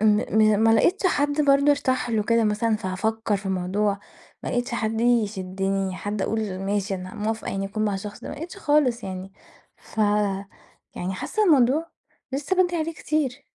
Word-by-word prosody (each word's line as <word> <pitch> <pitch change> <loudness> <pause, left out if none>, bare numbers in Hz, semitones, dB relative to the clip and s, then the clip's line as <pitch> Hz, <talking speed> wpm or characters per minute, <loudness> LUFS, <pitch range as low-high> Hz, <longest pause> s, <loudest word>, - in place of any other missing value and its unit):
م 215 0 +4
ما 225 0 +5
لقيتش 365 - +3
حد 290 -3 +1
برضه 280 0 +4
أرتاح 260 -4 +1
له 220 -2 +1
كده 230 +1 +2
مثلًا 215 +1 +1
فهافكّر 215 +2 -1
في 195 0 -8
الموضوع، 195 +2 0 0.4
ما - - -4
لقيتش 245 0 -1
حد 225 -1 -1
يشدِّني، 195 -4 0
حد 205 -1 -3
أقول 215 -4 -2
ماشي 195 +1 -1
أنا 185 0 -7
موافقة 220 +1 -3
يعني 195 0 -2
أكون 215 +2 -2
مع 205 - 0
الشخص 205 +1 -6
ده، - - -8
ما - - -5
لقيتش 330 +6 -8
خالص 290 -9 +2
يعني. 190 0 -6 0.4
ف - - -15 1.0
يعني 185 +2 -3
حاسّة 430 - -1
الموضوع 300 -1 +4 0.5
لسه 290 +7 -1
بدري 355 -1 -1
عليه 330 0 -1
كتير. 290 -4 -2
220 Hz, 170 wpm, -24 LUFS, 195-275 Hz, 1.0 s, ما